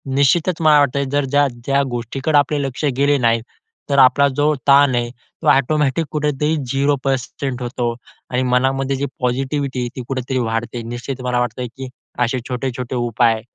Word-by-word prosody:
निश्चितच 160 +5 +2
मला 155 -2 +6
वाटत, 140 -1 +2
जर 145 -1 +1
ज्या 145 +1 +2 0.2
ज्या 140 0 +2
गोष्टीकडे 130 +5 -1
आपले 145 +1 +2
लक्ष 135 +3 -3
गेले 140 +1 +3
नाही 115 -2 +2 0.5
तर 140 - +1
आपला 135 +3 +6
जो 150 +1 +2
ताण 140 -2 +6
आहे 120 0 -1
तो 120 - -11
ऑटोमॅटिक 150 +3 +2
कुठेतरी 150 +1 0
0% 135 -1 -1
होतो 120 -1 -2 0.4
आणि 125 +1 0
मनामध्ये 135 +2 +1
जी 140 - -1 0.2
पॉझिटिव्हिटी 135 +1 -1
आहे 120 -1 -2
ती 130 - -5
कुठेतरी 130 0 -2
वाढते. 115 +1 -2
निश्चित 120 +3 -6
मला 125 -1 0
वाटत 120 +1 -3 0.2
की 130 -1 -6 0.3
असे 125 +1 +1
छोटे-छोटे 125 0 -3
उपाय, 120 -2 +1
135 Hz, 160 wpm, -19 LUFS, 125-140 Hz, 0.5 s, मला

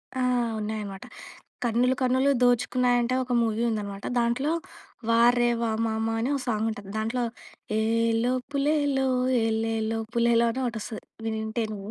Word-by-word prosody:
ఆ! 260 - -1 0.4
ఉన్నాయన్నమాట. 210 -2 -5 0.6
'కన్నులు 245 +2 +2
కన్నులు 260 +2 +3
దోచుకున్నాయంటే' 245 0 +2
ఒక 250 0 -4
మూవీ 225 0 0
ఉందనమాట. 200 -2 -4
దాంట్లో 240 +6 +1 0.6
'వారేవా 235 0 +3 0.2
మామ' 220 0 -1
అని 235 - 0
ఒక 280 - -1
సాంగ్ 220 -2 0
ఉంటుంది. 205 -3 -8
దాంట్లో 225 +3 -1 0.6
ఏలో 230 +2 +1 0.2
పులేలో 285 -1 +1 0.4
ఎలేలో 225 0 -1 0.2
పులేలో 235 0 +3
అని 255 +3 -3
ఒకటి 235 -2 -2
వస్తది. 215 +1 -7 0.2
వినుంటే 220 +1 -2
నువ్వు. 200 0 -7
230 Hz, 125 wpm, -26 LUFS, 220-250 Hz, 0.6 s, కన్నులు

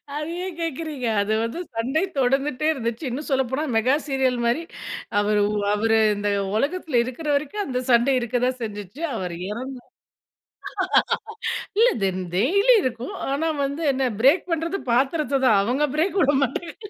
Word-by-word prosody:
அத 300 +1 -2 0.2
ஏன் 375 -3 -6
கேக்குறீங்க 310 -4 -4 0.2
அது 205 +2 0
வந்து 230 +9 -3 0.2
சண்டை 255 +8 0 0.2
தொடர்ந்துட்டே 270 +2 +1
இருந்தச்சு. 235 -2 -4
இன்னும் 270 +5 -5
சொல்லப்போனா 265 +1 0
மெகா 245 +5 +3
சீரியல் 265 -3 +1
மாரி 240 +8 +1 0.6
அவர் 210 0 +2 0.3
அவரு 225 +1 +2 0.2
இந்த 205 0 -1 0.3
உலகத்துல 290 0 0
இருக்கிற 260 +6 -6
வரைக்கும், 300 +9 -2
அந்த 250 -2 -2
சண்டை 240 +3 +4
இருக்க 240 0 -1
தான் 255 0 -2
செஞ்சுச்சு. 205 - -7
அவர் 180 -5 -4
இறந்தா 250 +3 -6 2.0
இல்ல 475 - +7 0.2
தென் 185 -1 -1
டெய்லி 400 - +4
இருக்கும். 250 - -3 0.2
ஆனா 310 +4 0 0.2
வந்து 280 +4 -3
என்ன 260 -1 0
பிரேக் 315 +8 +4
பண்ணுறது 330 +4 -1
பாத்திரத்த 275 +2 +1
தான். 215 -5 +5
அவங்க 260 +7 +1
பிரேக் 365 +5 +1
விட 290 +1 +3
மாட்டங்க. 315 +6 -5
265 Hz, 145 wpm, -23 LUFS, 235-305 Hz, 2.0 s, இல்ல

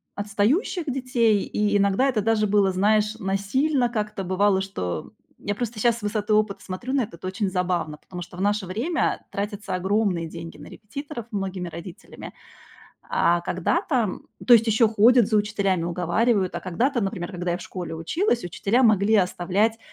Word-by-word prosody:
отстающих 235 - 0
детей, 250 -6 +1
и 205 -1 0
иногда 200 +6 +2
это 240 -6 +1
даже 215 0 +2
было, 200 -1 +3
знаешь, 210 +3 +2
насильно 235 +7 0
как-то 210 -3 -3
бывало, 190 +1 +2
что, 140 - -3
м, - - -18 0.3
я 205 - 0
просто 235 0 -4
сейчас 235 +1 +2
с 235 - -11
высоты 210 0 -1
опыта 210 -1 +1
смотрю 200 +8 -5
на 275 - +3
это. 210 -6 -6
Это 170 - -11
очень 195 +1 -1
забавно, 180 -4 -1
потому 180 +3 -9
что 175 +1 -10
в - - -4
наше 205 -1 0
время 250 - -1
тратятся 205 -1 -4
огромные 190 -2 0
деньги 165 -1 -9
на 150 - -11
репетиторов 245 +2 -8
многими 190 -3 -3
родителями. 170 +2 -10 0.8
А 170 0 +2
когда-то 235 - 0 0.3
то 245 - +5
есть 225 0 +4
ещё 220 +1 +4
ходят 225 +1 +5
за 220 - +2
учителями, 200 -4 0
уговаривают. 185 +4 +1
А - - -3
когда-то, 240 +9 0
например, 195 -3 -3
когда 175 -2 -3
я 175 - -1
в - - -9
школе 175 -3 -6
училась, 240 - 0
учителя 200 +7 +1
могли 215 -2 +4
оставлять 200 +3 +1
205 Hz, 170 wpm, -24 LUFS, 185-230 Hz, 0.8 s, то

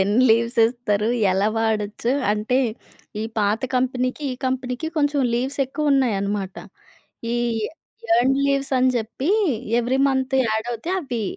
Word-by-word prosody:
ఎన్ని 205 +6 +3
లీవ్స్ 230 +2 +2
ఇస్తారు, 225 -3 -1 0.3
ఎలా 195 +3 +2
వాడొచ్చు 220 +1 -1 0.2
అంటే 215 +4 0 0.6
ఈ - - -2 0.2
పాత 210 +1 +1
కంపెనీకి 255 +2 0
ఈ - - -4
కంపెనీకి 255 +3 -2
కొంచెం 290 -1 +2
లీవ్స్ 260 +4 -2
ఎక్కువ 290 +2 0
ఉన్నాయనమాట. 200 -7 0 0.8
ఈ - - +1 0.8
ఎర్న్‌డ్ 260 +3 +3
లీవ్స్ 275 0 0
అని 255 0 +4
చెప్పీ 235 +5 -3 0.5
ఎవరీ 245 +2 0
మంత్ 265 0 0
యాడ్ 220 +1 -1
అవుతే 235 +9 -5
అవి 250 -9 -3
245 Hz, 130 wpm, -22 LUFS, 220-265 Hz, 0.8 s, అని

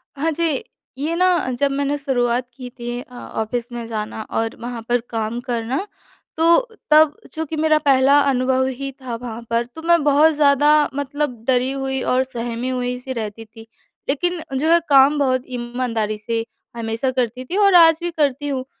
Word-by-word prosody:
हाँ 310 +4 0
जी। 320 -3 -1 0.3
ये 305 +5 -2
ना 365 +2 +3 0.3
जब 280 -1 +2
मैंने 280 +1 -1
शुरुआत 250 -3 0
की 250 -1 -8
थी 240 0 -4
अ, 250 -1 -16
ऑफ़िस 230 0 -4
में 240 -1 -5
जाना 220 -1 -4
और 225 0 -2
वहाँ 240 -1 -5
पर 245 0 +2
काम 225 +1 -3
करना, 245 - -2 0.5
तो 330 +1 +5 0.3
तब 305 -1 +6 0.2
चूँकि 320 -1 -4
मेरा 310 0 +3
पहला 275 +1 +5
अनुभव 260 0 +1
ही 275 0 -4
था 250 -3 -4
वहाँ 230 -1 -7
पर 230 +1 +1
तो 320 - -8
मैं 340 -1 +3
बहुत 295 +2 +5
ज़्यादा 290 -1 +4 0.3
मतलब 285 -4 -3
डरी 255 0 +2
हुई 270 -1 -2
और 255 +1 +2
सहमी 240 -1 -4
हुई-सी 250 0 -3
रहती 225 -1 -5
थी। 225 +1 -15 0.4
लेकिन 350 +5 0 0.2
जो 310 +4 0
है 340 - +6
काम 275 +1 +6
बहुत 255 -2 +1
ईमानदारी 240 -3 -2
से 225 +1 -3 0.3
हमेशा 230 +3 -2
करती 250 -1 -2
थी 360 +9 -3
और 400 -2 +5
आज 325 -2 +7
भी 345 0 -2
करती 290 -3 0
हूँ। 265 -2 -2
260 Hz, 175 wpm, -20 LUFS, 240-290 Hz, 0.5 s, आज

